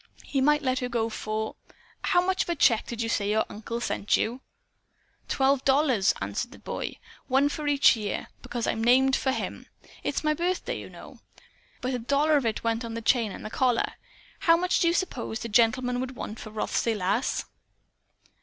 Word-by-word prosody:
He 275 - -1
might 295 +2 +3
let 255 -1 +1
her 250 - -3
go 230 -2 0
for 220 0 -4 0.5
How 355 0 +3
much 375 0 +1
of - - -2
a 345 - +1
check 235 -6 +3
did 235 -1 -3
you - - -2
say 205 -3 0
your 220 +1 +2
uncle 225 +2 -5
sent 210 -3 +1
you?" 245 +4 -2 0.9
"Twelve 270 0 +2
dollars," 265 -7 +3
answered 100 - -3
the - - -13
boy, - - -5 0.3
"one 275 +2 +3
for 295 0 -4
each 285 -2 +5
year. 210 -3 -3 0.2
Because 240 -2 -3
I'm 225 - -1
named 260 +2 +5
for 265 - 0
him. - - -4 0.3
It's - - -2
my 305 0 +3
birthday, 350 +4 -2
you - - -9
know. - - -13 0.6
But 255 - -1
but - - -2
a 250 - -1
dollar 285 +6 +2
of 275 -5 +2
it 220 - -2
went 230 0 0
for 230 - -5
the 230 0 -5
chain 230 -3 +2
and - - -8
the 215 - -6
collar. 250 -2 +1 0.5
How 330 -1 +5
much 360 +1 +1
do 335 - +3
you 335 - +3
suppose 260 -11 -2
the 230 - -6
gentleman 245 +3 +3
would 260 0 -4
want 220 -2 -6
for 215 - -8
Rothsay 220 +1 -1
Lass?" 205 +5 0
245 Hz, 200 wpm, -27 LUFS, 225-280 Hz, 0.9 s, each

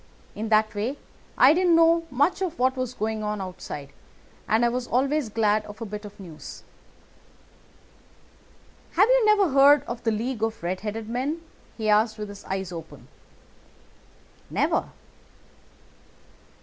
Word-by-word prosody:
In 220 +1 -5
that 215 0 +3
way 225 +7 -3 0.4
I 265 +4 +7
didn't 350 0 +3
know 330 0 +4
much 290 +9 +1
of 350 -3 -2
what 260 +1 +2
was 255 -1 -4
going 220 0 -2
on 210 0 -2
outside, 150 -7 -7 0.5
and 225 +2 +3
I - - +3
was 245 +1 -3
always 275 +1 0
glad 215 -1 +1
of 210 +1 -11
a 230 - -5
bit 210 0 -7
of 205 0 -12
news. 170 -5 -10 2.3
"'Have 390 +5 +5
you - - +4
never 410 -4 +4
heard 280 +1 +6
of 240 -3 -6
the 230 - 0
League 225 +2 -2
of 225 0 -1
the - - -9
Red 185 +2 -2
headed 215 +1 -5
Men?' 270 +8 -3 0.3
he 220 -2 -3
asked 215 +1 +3
with 210 -1 -6
his 200 0 -10
eyes 190 -1 -4
open. 165 -2 -10 1.4
"'Never. - - 0
225 Hz, 150 wpm, -25 LUFS, 210-280 Hz, 2.3 s, I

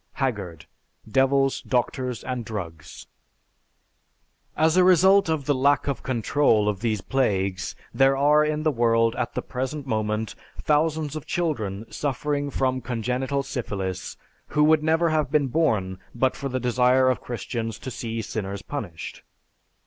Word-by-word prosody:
(Haggard, 100 - -3 0.4
"Devils, 135 +3 +2
Doctors, 125 0 -1
and 125 -2 -3
Drugs.") 85 -8 -7 1.5
As 160 +1 +3
a 185 - +6
result 190 +1 +5
of 155 -4 -1
the 145 - +2
lack 140 +1 +2
of 140 - -2
control 115 -3 +2
of 105 -2 0
these 110 -3 -1
plagues 100 -8 -1 0.2
there 135 +2 +4
are 150 +2 +5
in 150 0 -1
the 155 - +3
world 115 -2 +2
at 120 - -3
the - - -2
present 130 +3 -4
moment 110 -2 -1 0.2
thousands 155 0 0
of 155 0 -6
children 115 - -2
suffering 145 +1 -2
from 130 -1 0
congenital 125 +4 -2
syphilis 95 -7 -4 0.3
who 150 - +2
would 155 0 +5
never 160 +2 +2
have 155 -4 +1
been 145 -2 +2
born 110 - 0 0.2
but 130 +2 +1
for 140 - -4
the 130 0 -2
desire 125 +1 +3
of 130 - +1
Christians 115 -2 -4
to 130 - -7
see 115 -1 -4
sinners 100 -1 -4
punished. 100 - -6
130 Hz, 145 wpm, -25 LUFS, 110-145 Hz, 1.5 s, a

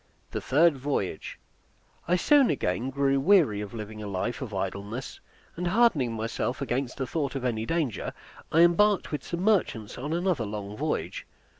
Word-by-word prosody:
THE - - -3
THIRD 155 +2 +4
VOYAGE 125 - -3 0.7
I 175 - +3
soon 275 - +5
again 120 -1 -1
grew 135 0 +1
weary 145 - +4
of 105 - -6
living 110 -1 -7
a 105 - -5
life 100 +7 -3
of 125 -5 -5
idleness, 100 +5 -4 0.4
and 175 +1 -2
hardening 175 - +3
myself 115 +2 -2
against 130 -1 -2
the 135 - -1
thought 140 0 -2
of 130 -2 -3
any 110 -2 -1
danger, 155 - -1 0.4
I 165 - +5
embarked 195 +4 +4
with 150 - -3
some 170 0 -4
merchants 170 - +1
on 145 +4 -4
another 170 -6 0
long 105 -1 -5
voyage. - - -3
135 Hz, 165 wpm, -27 LUFS, 110-170 Hz, 0.7 s, soon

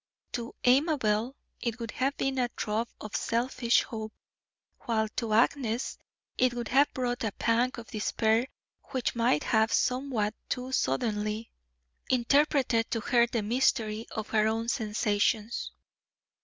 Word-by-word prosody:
To 235 -1 -5
Amabel 255 -4 +2 0.2
it 235 -1 -2
would 230 -1 -4
have 270 +2 -1
given 270 -1 0
a 245 -1 +1
throb 220 +2 -1
of 215 0 -7
selfish 235 0 +1
hope, 220 -1 -6 0.7
while 220 -3 0
to 225 +1 -3
Agnes 235 +1 +1 0.4
it 250 -1 +3
would 240 -2 -4
have 280 +3 +4
brought 245 -2 -2
a 220 - 0
pang 235 +2 +2
of 235 - -8
despair 220 +2 +1 0.4
which 260 -3 -2
might 230 -11 +2
have 220 0 +2
somewhat 250 -5 +1 0.2
too 250 +1 -3
suddenly 215 - -1 0.6
interpreted 255 -2 +2
to 230 - -1
her 240 0 +3
the 230 -2 -2
mystery 225 -1 +1
of 220 -1 -5
her 215 -1 +3
own 225 +1 -1
sensations. 215 -1 0
230 Hz, 135 wpm, -29 LUFS, 220-250 Hz, 0.7 s, have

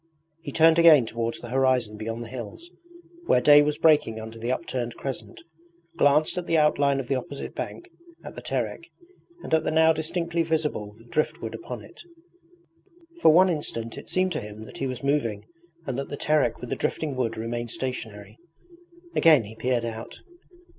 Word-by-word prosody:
He - - -6
turned 165 +1 +5
again 155 -7 +7
towards 115 +1 -3
the 120 - -8
horizon 130 -4 +1
beyond 115 +2 -5
the - - -9
hills, 130 - -8 0.6
where - - +5
day 145 +3 +7
was 150 0 0
breaking 150 -8 +3
under 110 +1 -9
the 120 +2 -2
upturned 125 -4 -3
crescent, 135 -2 -6 0.6
glanced 155 +2 +3
at 175 - -7
the 165 - +2
outline 140 -2 +3
of 130 - -5
the 140 - 0
opposite 135 +2 -5
bank, 350 - -6 0.4
at - - -8
the - - -9
Terek, 340 - -3 0.5
and - - -5
at 160 - +4
the - - -1
now 160 +1 +4
distinctly 170 +2 -2
visible 155 -11 -2 0.2
driftwood 155 - -1
upon - - -7
it. - - -14 1.2
For - - +7
one 180 +4 +6
instant 115 -9 -3
it - - -10
seemed 185 0 +1
to 155 - -2
him 105 +1 -9
that - - -12
he 135 - -1
was 130 +1 -5
moving 115 -8 0 0.4
and 130 -1 -3
that 140 - -5
the 145 - -5
Terek 150 -6 +1
with 125 - -8
the - - 0
drifting 150 -4 -2
wood 115 -3 -2
remained 120 +1 -4
stationary. 110 -5 -6 0.8
Again 155 -7 +6
he 110 +2 -11
peered 120 0 -1
out. 115 0 -7
135 Hz, 180 wpm, -25 LUFS, 115-155 Hz, 1.2 s, again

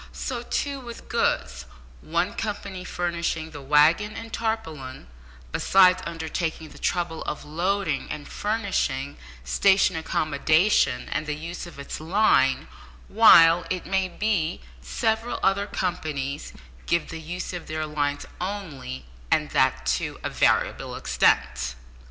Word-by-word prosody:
So, 250 -4 -4
too, 280 +3 -2
with 235 -2 -10
goods 60 -1 0 0.4
one 170 +4 -1
company 200 -3 -4
furnishing 170 -2 -2
the 145 - -8
waggon 155 +10 +4
and 225 -1 -8
tarpaulin, 160 - -4 0.5
besides 185 - +5
undertaking 160 -1 -3
the - - -14
trouble 170 -2 -1
of 150 - -4
loading 170 0 -1
and 150 -1 -6
furnishing 195 -11 -2 0.3
station 190 - +3
accommodation 155 -1 +2
and 155 - -2
the 150 - -1
use 170 +3 -6
of 170 - -12
its 140 - -6
line, 160 -6 +3 0.4
while, 165 - +7
it 185 -2 -3
may 190 0 +1
be, 180 - -1 0.2
several 220 - -1
other 200 +1 +2
companies 150 -8 -3 0.4
give 170 -2 +1
the 165 -1 -6
use 175 +3 -5
of 175 - -6
their 155 0 -2
lines 145 -1 -2 0.2
only, 160 - -5 0.2
and - - +1
that 65 0 +2
to 65 0 -1
a - - -2
variable - - +1
extent. 60 +1 +1
165 Hz, 130 wpm, -25 LUFS, 145-195 Hz, 0.5 s, while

